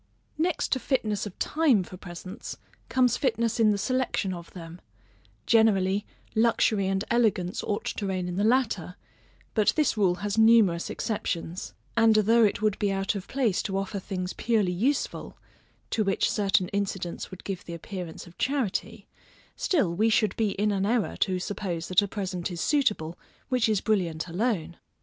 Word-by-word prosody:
Next 340 0 0
to 260 - +2
fitness 215 -6 -1
of 190 - -11
time 290 - +2
for 185 - -10
presents, 180 +2 -8 0.3
comes 255 -2 +3
fitness 235 -3 0
in 220 -1 +5
the 205 - +2
selection 235 -3 0
of 170 -1 -9
them; 170 -1 -10 0.6
generally, 205 -3 +3 0.3
luxury 220 -3 +2
and 195 +1 0
elegance 215 -6 +1
ought 205 - -2
to 200 - -3
reign 185 -2 -2
in 180 - -4
the 200 - 0
latter; 220 -7 +1 0.6
but 215 -2 +3
this 305 -6 +2
rule 190 -5 +2
has 205 +2 0
numerous 220 -7 +5
exceptions: 180 -5 -3 0.2
and 225 -1 +5
although 225 +2 +5
it 210 0 +1
would 210 -2 +1
be 205 -1 +1
out 195 0 0
of 200 -2 -6
place 245 -8 +1
to 195 -1 -2
offer 195 +1 -3
things 185 -1 -4
purely 215 -6 +1
useful 255 +11 -1 0.5
(to 220 - +1
which 195 -1 +1
certain 195 -3 +2
incidents 195 -3 -3
would 185 - -11
give 195 -3 -5
the 170 - -6
appearance 175 -1 -7
of 175 0 -17
charity) 225 -5 -2 0.5
still 270 - +1
we 215 +6 +2
should 215 -3 +2
be 215 -3 0
in 210 +1 +1
an 195 -1 0
error 225 +1 +1
to 185 -2 +1
suppose 180 -3 -4
that 185 +2 +5
a 205 - -2
present 185 -3 -3
is 175 -2 -6
suitable, 205 - 0 0.3
which 250 -3 +2
is 210 -3 +1
brilliant 180 -7 0
alone. 175 -3 -1
200 Hz, 170 wpm, -27 LUFS, 185-225 Hz, 0.6 s, in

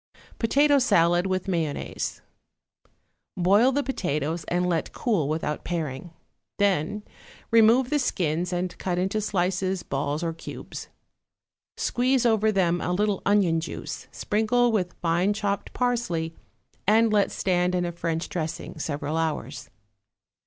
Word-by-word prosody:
=Potato 285 +5 +4
Salad 175 -7 +3
with 185 0 -1
Mayonnaise.= 165 -6 -2 1.1
Boil 200 +8 +4
the 285 +2 0
potatoes 165 - -2
and 180 +1 0
let 170 -2 -1
cool 190 - 0
without 155 -1 -2
paring. 160 -2 -4 0.5
Then 200 0 +1 0.5
remove 230 +3 +5
the 300 - +2
skins 175 - -1
and 180 0 -2
cut 180 -2 -1
into 190 +4 0
slices, 190 -1 -1
balls, 145 +3 -2
or 165 -1 -1
cubes. 165 - -8 0.9
Squeeze 255 0 +1
over 220 -2 +3
them 175 -3 +1
a 180 - -1
little 205 +1 0
onion 195 -5 +3
juice, 165 - -6
sprinkle 235 +3 +1
with 185 -5 -1
fine 175 +4 +2
chopped 205 -1 -2
parsley, 230 -10 -1 0.5
and 220 +1 +4
let 205 -2 +3
stand 180 -1 0
in 180 -1 0
a 175 - -2
French 165 0 -3
dressing 160 -2 -5
several 150 +1 -2
hours. 160 -2 -3
180 Hz, 130 wpm, -26 LUFS, 165-215 Hz, 1.1 s, remove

